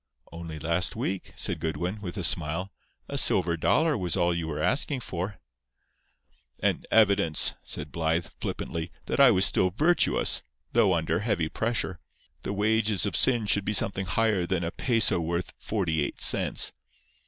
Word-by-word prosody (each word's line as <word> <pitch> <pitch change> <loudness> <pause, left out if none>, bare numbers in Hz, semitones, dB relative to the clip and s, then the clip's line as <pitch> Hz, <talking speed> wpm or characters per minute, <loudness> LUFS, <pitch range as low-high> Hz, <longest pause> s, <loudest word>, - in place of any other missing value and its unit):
"Only 85 -1 -8
last 85 +4 -1
week," 95 0 -4
said - - -1
Goodwin, 90 +5 -3
with 90 -4 -6
a - - -3
smile, 85 +6 0 0.4
"a - - +1
silver 85 -2 +4
dollar 155 - +2
was 90 -3 -2
all 85 -1 +2
you 85 -1 -3
were 75 -2 -4
asking 135 0 +1
for." 95 0 -5 1.2
"An - - -1
evidence," 100 -7 +3
said 75 -1 -6
Blythe, 85 +1 -1
flippantly, 85 0 -4 0.2
"that - - -3
I 140 -2 +8
was 95 -4 +3
still 95 - +2
virtuous—though 90 - 0
under 80 +1 -1
heavy 100 -8 -1
pressure. 110 -5 -2 0.4
The - - -4
wages 105 -1 +1
of 100 -6 -2
sin 120 +6 +3
should 100 0 +2
be 105 - -2
something 95 -2 +1
higher 100 -2 +1
than 90 -2 -1
a 85 - -3
peso 115 -4 +2
worth 85 +2 -3
forty 85 -8 -1
eight - - -5
cents. - - +2
90 Hz, 155 wpm, -27 LUFS, 85-105 Hz, 1.2 s, I